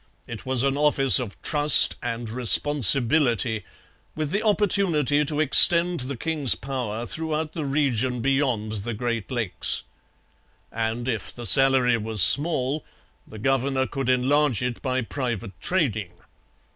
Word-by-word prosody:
It 115 +2 -10
was 130 -1 -1
an 135 0 -2
office 140 -3 +3
of 115 -6 -8
trust 150 -1 +6
and 115 0 -6
responsibility, 120 - +1 0.5
with 155 -1 -5
the 205 - -2
opportunity 185 - -1
to 150 +1 -5
extend 170 +4 +6
the 130 +1 -4
king's 150 -3 -1
power 120 -4 -7
throughout 160 +1 -6
the 155 -3 -6
region 130 -3 -2
beyond 130 -4 -3
the 120 +2 -7
Great 115 -1 -5
Lakes. 120 -8 -1 0.9
And 115 +2 -5
if 115 -6 -5
the 120 - -11
salary 130 -2 +3
was 110 -3 +2
small, 145 - +3 0.4
the 110 - -13
governor 135 +2 -2
could 135 -2 -6
enlarge 130 0 -1
it 125 -1 -6
by 130 -1 -4
private 115 -4 -6
trading. 110 - -3
130 Hz, 135 wpm, -22 LUFS, 115-145 Hz, 0.9 s, trust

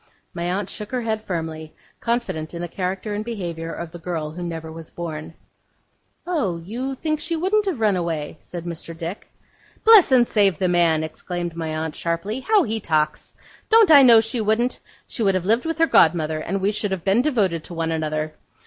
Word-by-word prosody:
My 170 -1 -4
aunt 190 +1 -2
shook 210 +1 -7
her 250 - 0
head 220 -2 -2
firmly, 160 -5 -5 0.2
confident 230 -10 -2
in 170 - -4
the - - -3
character 185 +4 -3
and 210 +1 -2
behaviour 170 -8 -5
of 170 -1 -6
the 175 - -9
girl 160 -3 -4
who 175 +3 -8
never 165 -2 -5
was 160 0 -10
born. 160 -2 -6 0.9
'Oh! 290 - -1
you 240 +11 -4
think 310 +2 -2
she 335 +2 -3
wouldn't 395 +5 +1
have 345 -10 -1
run 210 -3 +3
away?' 165 -4 -3
said 175 -1 -8
Mr. 165 -1 -6
Dick. 170 +5 -6 0.6
'Bless 440 -9 +8
and 250 -2 +6
save 200 -7 +2
the 185 - +1
man,' 170 -3 +3
exclaimed 175 +1 -5
my 165 -1 -3
aunt, 160 -1 -3
sharply, 170 +8 -2
'how 415 +7 +3
he 220 0 -2
talks! 155 -5 -1 0.3
Don't 445 -6 +6
I 285 -2 +10
know 235 -4 +8
she 225 +1 -2
wouldn't? 220 +4 +1 0.3
She - - -5
would 195 -3 +3
have 185 -1 -1
lived 230 +8 +2
with 325 - -2
her 330 - +5
god 170 - +5
mother, 155 -1 -2
and 190 +5 -3
we 200 +2 +2
should 210 0 -2
have 190 -3 -3
been 200 +5 +4
devoted 205 - 0
to 175 - -7
one 165 0 -1
another. 155 -1 -2
185 Hz, 205 wpm, -22 LUFS, 165-230 Hz, 0.9 s, I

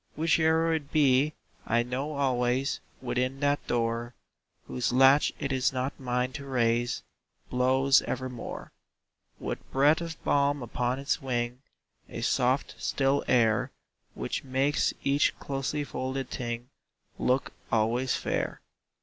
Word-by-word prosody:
Whiche'er 160 0 +3
it 145 -3 -5
be, 145 0 +3 0.3
I 115 +1 +3
know 130 +5 -3
always 130 -1 +1 0.2
Within 125 +2 -1
that 145 0 +1
door 115 0 -1 0.5
Whose 125 - -1
latch 135 +3 +5
it 135 - -3
is 130 -2 +2
not 130 +1 -3
mine 125 0 -1
to 140 - -6
raise 120 - +1 0.5
Blows 130 +2 +4
evermore, 125 -2 -5 0.7
With - - -3
breath 145 +5 +4
of 165 -2 -5
balm 140 -1 +2
upon 120 +2 -1
its 140 +3 -1
wing, 125 -1 -2 0.5
A - - -6
soft, 130 +3 +1
still 135 +1 +1
air, 110 -3 +3 0.5
Which - - -3
makes 135 +2 +1
each 140 +1 +2
closely 140 +2 -2
folded 130 -1 -4
thing 120 0 -4 0.5
Look 130 +1 +1 0.2
always 120 +4 +2
fair. - - -2
130 Hz, 125 wpm, -28 LUFS, 125-140 Hz, 0.7 s, latch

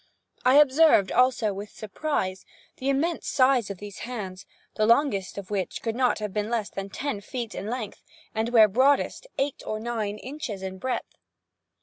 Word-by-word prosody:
I 255 +2 +5
observed 290 - +6
also, 245 -4 +3
with 200 +2 -7
surprise, 205 -4 -3 0.3
the 265 - -2
immense 310 +5 0
size 255 -5 +3
of 200 - -5
these 205 +1 -9
hands, 200 -6 -6 0.3
the 215 - +1
longest 230 -8 +2
of 200 0 -7
which 195 -3 -2
could 225 -1 -2
not 250 0 +2
have 210 -3 -4
been 210 0 -1
less 230 -4 -1
than 195 0 -5
ten 255 -1 -3
feet 235 +2 -5
in 200 - -5
length, 225 -3 -5 0.3
and, 220 +1 -1
where 225 -3 +7
broadest, 270 - +2
eight 275 0 -1
or 215 - -3
nine 220 -3 -3
inches 250 -7 -6
in 190 0 -5
breadth. 255 +5 -3
225 Hz, 175 wpm, -26 LUFS, 200-260 Hz, 0.3 s, where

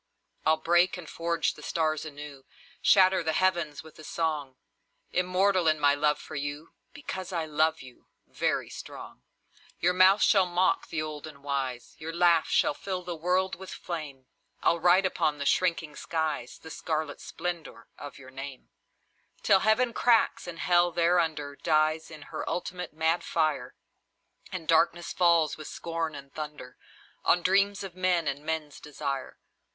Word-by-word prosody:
I'll 160 0 +5
break 175 +3 +3
and 175 -3 -9
forge 170 +1 -1
the - - -13
stars 155 -2 -1
anew, 145 -2 -9 0.4
Shatter 190 -1 +5
the 160 -1 -1
heavens 170 -6 0
with 160 0 -15
a - - -10
song; 150 -5 -2 0.6
Immortal 185 0 +2
in 155 -1 +3
my 145 -1 +4
love 150 +1 +2
for - - -11
you, 145 +2 -5 0.2
Because 190 -11 -6
I 165 -3 -1
love 155 0 +1
you, 130 -1 -16 0.2
very - - -1
strong. - - -10 0.6
Your 180 +2 +2
mouth 185 +3 +6
shall 195 -4 +5
mock 180 +1 +1
the 160 -2 -2
old 155 -1 -6
and 140 -2 -13
wise, 135 -4 -3
Your 160 +1 -5
laugh 170 -1 +4
shall - - +3
fill 185 +3 -5
the 175 -1 -4
world 180 +3 0
with 190 +1 -7
flame, 150 -6 -6 0.4
I'll 170 - +3
write 180 +3 +5
upon 155 -5 0
the 140 - -4
shrinking 165 -2 +1
skies 155 -7 -3
The 160 - -11
scarlet 155 -2 -3
splendour 165 -9 -6
of 145 - -9
your 130 -1 -13
name, 135 0 -9 0.7
Till 195 - +5
Heaven 230 +4 +2
cracks, 230 -6 +2
and 170 -1 -6
Hell 175 0 +3
thereunder 165 -4 +1
Dies 155 0 +1
in 155 -2 -10
her - - -6
ultimate 180 0 -4
mad 160 +2 0
fire, 155 -3 -1 0.8
And 175 -4 -6
darkness 170 +1 +2
falls, 170 -4 +3
with 155 - -8
scornful 160 -4 -5
thunder, 150 -5 -7 0.5
On 175 - +3
dreams 200 +2 +2
of 190 -3 -7
men 180 -3 +1
and 140 +1 -2
men's 155 -2 -3
desire. 140 -2 -5
160 Hz, 155 wpm, -28 LUFS, 150-180 Hz, 0.8 s, mouth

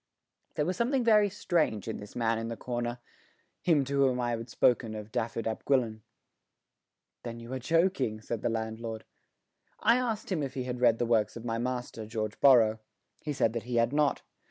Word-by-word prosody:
There 150 - +1
was 180 +2 -2
something 250 +2 +1
very 210 -3 +5
strange 165 - 0
in 110 - -3
this 105 0 -11
man 115 -1 +1
in 115 - -4
the 115 -1 -5
corner 120 -1 -3 0.6
him 155 -6 +3
to 140 +1 -1
whom 130 -2 +3
I 120 -1 0
had 115 0 -4
spoken 115 -2 +2
of 105 0 -8
Dafydd 115 +1 -2
ap 110 - -3
Gwilyn. 120 -6 +1 1.2
"Then 115 -1 -6
you 115 +2 -8
are 130 - -2
joking," 145 - +1
said 110 0 -4
the - - 0
landlord. 110 0 -4 0.8
I 230 +3 +4
asked 230 -5 -2
him 170 -5 0
if 135 -1 -4
he 130 - -2
had 125 -1 -4
read 115 -2 +5
the 120 - 0
works 110 -2 +1
of 115 - -9
my 115 -1 -1
master, 125 -3 -4
George 110 -1 -4
Borrow. 115 -5 +6 0.4
He 150 - -3
said 125 -5 +1
that 115 -2 -4
he 120 - -1
had 115 +2 +2
not. 150 -1 +2
120 Hz, 200 wpm, -30 LUFS, 115-140 Hz, 1.2 s, Borrow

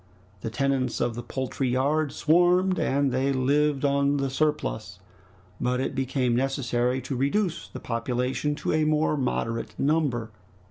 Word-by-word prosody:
The 110 - -4
tenants 135 +1 0
of 120 - 0
the 120 - -5
poultry 130 +1 -3
yard 140 +4 +1
swarmed, 180 +3 +3
and 140 0 +1
they 130 +2 +1
lived 140 +2 +1
on 140 0 +2
the 135 -1 -1
surplus, 150 - -1 0.6
but 125 +1 0
it 135 - -2
became 130 -2 0
necessary 125 -1 0
to 130 +2 -4
reduce 165 +7 0
the - - -8
population 125 +5 -1
to - - -2
a 155 0 +2
more 155 0 +2
moderate 115 -4 -2
number. 135 -7 0
135 Hz, 145 wpm, -26 LUFS, 125-150 Hz, 0.6 s, swarmed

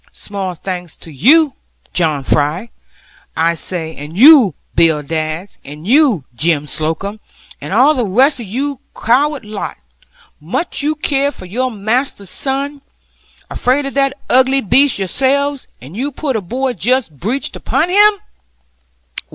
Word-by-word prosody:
Small 195 -3 -5
thanks 180 -1 -6
to 165 - -12
you, 280 - +4 0.4
John 155 -5 0
Fry, 155 - 0 0.7
I 165 +1 +2
say, 165 -1 -3
and 150 +4 -9
you 255 - +7 0.2
Bill 160 -3 +3
Dadds, 160 +5 -4
and 150 +3 -11
you 250 - +3
Jem 150 +3 +1
Slocomb, 160 +8 -3 0.4
and - - -7
all 260 +9 +5
the 245 -6 -1
rest 260 +9 +3
of 230 - -7
your 270 +6 -3 0.2
coward 275 +3 +1
lot; 210 -1 -6 0.6
much 180 - -3
you 300 +2 0
care 285 -2 0
for 285 - -10
your 250 +8 -2
master's 220 -2 -2
son! 280 +1 -3 0.7
Afraid 265 +3 0
of 275 - -5
that 275 0 0
ugly 260 +1 +4
beast 270 +6 +3
yourselves, 275 +8 0
and 135 +9 -12
you 270 +6 -3
put 275 -1 -3
a 220 - -1
boy 255 +7 -2
just 215 - -1
breeched 240 +9 -2
upon 285 +8 -1
him!' 415 +3 +5
230 Hz, 145 wpm, -16 LUFS, 170-275 Hz, 0.7 s, you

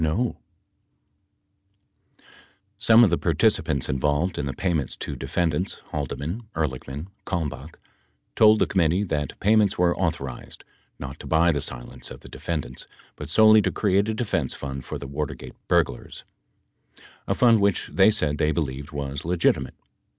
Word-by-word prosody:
1032 100 +10 0 1.8
33] - - -29 0.5
Some 115 +2 +6
of 100 - +4
the 85 - +1
participants 80 - +1
involved 75 +7 0
in 70 - -2
the 70 - -3
payments 80 -1 -1
to - - -5
defendants 85 +1 -1
(Haldeman, 75 - -4
Ehrlichman, 70 -1 -3 0.2
Kalmbach) 80 -4 -4 0.6
told 110 0 +6
the - - +3
committee 90 +1 +1
that 75 -7 -3
pay 105 +3 +3
ments 105 -3 +3
were 85 -1 +3
authorized, 70 -8 -4 0.3
not 70 -1 -8
to - - -9
buy 85 +2 +4
the 70 -3 -1
silence - - -6
of - - -10
the - - -13
defendants, 75 -7 -5 0.3
but 75 - -8
solely 110 +4 +6
to - - 0
create 100 +1 +1
a 110 - -1
defense 115 0 -1
fund 70 -2 -6
for - - -5
the - - -8
Watergate 70 +2 -5
burglars, - - 0 1.0
a - - +1
fund 115 -4 +5
which 100 -1 +1
they 95 +2 +6
said 75 -8 0
they 75 - +2
believed 70 -2 -3
was 70 -1 -4
legitimate. 85 0 +1
80 Hz, 150 wpm, -24 LUFS, 70-100 Hz, 1.8 s, Some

